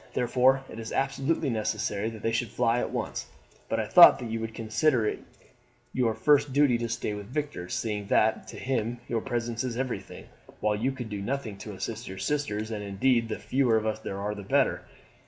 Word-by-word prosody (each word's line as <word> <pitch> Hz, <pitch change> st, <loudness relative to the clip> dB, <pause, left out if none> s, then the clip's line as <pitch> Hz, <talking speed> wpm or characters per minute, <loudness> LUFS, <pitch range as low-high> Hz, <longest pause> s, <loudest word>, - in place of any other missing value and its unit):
Therefore 130 Hz, +2 st, +3 dB
it 110 Hz, -, -9 dB
is 115 Hz, -1 st, -6 dB
absolutely 135 Hz, +2 st, 0 dB
necessary 110 Hz, -1 st, -1 dB
that 110 Hz, -2 st, -10 dB
they 115 Hz, -, +1 dB
should 120 Hz, 0 st, -1 dB
fly 115 Hz, +3 st, +1 dB
at -, -, -1 dB
once; -, -, -4 dB, 0.4 s
but 115 Hz, -, 0 dB
I 110 Hz, -, 0 dB
thought 110 Hz, +11 st, +9 dB
that 120 Hz, -3 st, -6 dB
you 115 Hz, -, -2 dB
would 115 Hz, 0 st, -5 dB
consider 115 Hz, +2 st, +1 dB
it -, -, -1 dB, 0.7 s
your 115 Hz, -4 st, +1 dB
first 145 Hz, -1 st, +3 dB
duty 135 Hz, -3 st, +3 dB
to 115 Hz, -1 st, -2 dB
stay 115 Hz, -2 st, -2 dB
with 105 Hz, -1 st, -7 dB
Victor, 145 Hz, -9 st, -4 dB
seeing 105 Hz, -3 st, -2 dB
that 110 Hz, +2 st, +2 dB
to -, -, -9 dB
him 120 Hz, -2 st, -2 dB
your 115 Hz, -1 st, -1 dB
presence 120 Hz, 0 st, -2 dB
is 120 Hz, -2 st, -3 dB
everything, 130 Hz, -1 st, -4 dB, 0.3 s
while 105 Hz, 0 st, +1 dB
you 120 Hz, +6 st, 0 dB
could 125 Hz, -4 st, -6 dB
do 105 Hz, -2 st, -4 dB
nothing 120 Hz, -1 st, -3 dB
to 105 Hz, 0 st, -7 dB
assist 110 Hz, +5 st, -5 dB
your 95 Hz, -, -7 dB
sisters, 110 Hz, -6 st, -2 dB
and 105 Hz, -2 st, -4 dB
indeed 115 Hz, +4 st, +1 dB
the 110 Hz, -, -2 dB
fewer 125 Hz, -4 st, +2 dB
of 110 Hz, -, -1 dB
us 110 Hz, 0 st, -1 dB
there 100 Hz, -, -5 dB
are 105 Hz, +1 st, -2 dB
the 105 Hz, -, -7 dB
better." 95 Hz, -, +1 dB
115 Hz, 210 wpm, -28 LUFS, 110-130 Hz, 0.7 s, thought